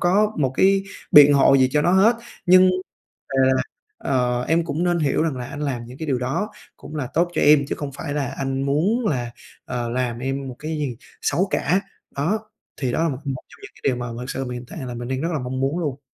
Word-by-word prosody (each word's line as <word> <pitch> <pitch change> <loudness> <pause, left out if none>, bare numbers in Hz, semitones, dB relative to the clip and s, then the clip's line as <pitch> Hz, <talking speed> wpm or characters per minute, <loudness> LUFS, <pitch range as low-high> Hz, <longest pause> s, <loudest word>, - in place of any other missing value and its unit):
có 205 +4 +3
một 135 -4 +2
cái 195 +5 +4 0.3
biện 145 -1 +9
hộ 135 0 +5
gì 130 -1 +4
cho 150 - +3
nó 175 - +3
hết. 210 +5 +5 0.3
Nhưng, 185 +1 +7 0.6
à, 135 - -3 0.6
ờ, 125 -2 0
em 165 +1 +2
cũng 160 +2 -2
nên 175 -1 +1
hiểu 150 0 +1
rằng 155 -5 -1
là 125 - -5
anh 145 - -8
làm 130 -5 -2
những 125 +2 -11
cái 160 - -5
điều 135 -4 0
đó 150 +12 -2 0.3
cũng 155 - -10
là 140 -4 -2
tốt 170 +2 +2
cho - - 0
em, 145 -1 +6
chứ - - -2
không 145 -2 -5
phải 145 +1 -5
là 145 -2 -1
anh 135 0 -2
muốn 180 - +1
là, 120 -7 -1 0.3
ờ, 120 -1 -3
làm 120 -1 -2
em 135 +2 -3
một 130 - -7
cái 155 +1 -5
gì 135 -6 -3 0.2
xấu 190 +3 +1
cả. 185 +7 +1 0.3
Đó, 170 +11 0 0.4
thì 130 - 0
đó 160 - 0
là 165 - +2
một 135 - -3
một 135 -2 -3
trong - - -18
những 410 - -10
cái - - -19
điều 130 - +2
mà 120 0 -4
thực 125 +1 -6
sự 135 - -3
mình 125 - -6
hiện 120 - -11
tại - - -8
là 125 - -5
mình 120 0 -6
đang 130 +1 -2
rất 165 - -1
là 155 - -1
mong 130 0 -4
muốn 135 +6 0
luôn. 145 -5 -3
140 Hz, 255 wpm, -22 LUFS, 130-165 Hz, 0.6 s, biện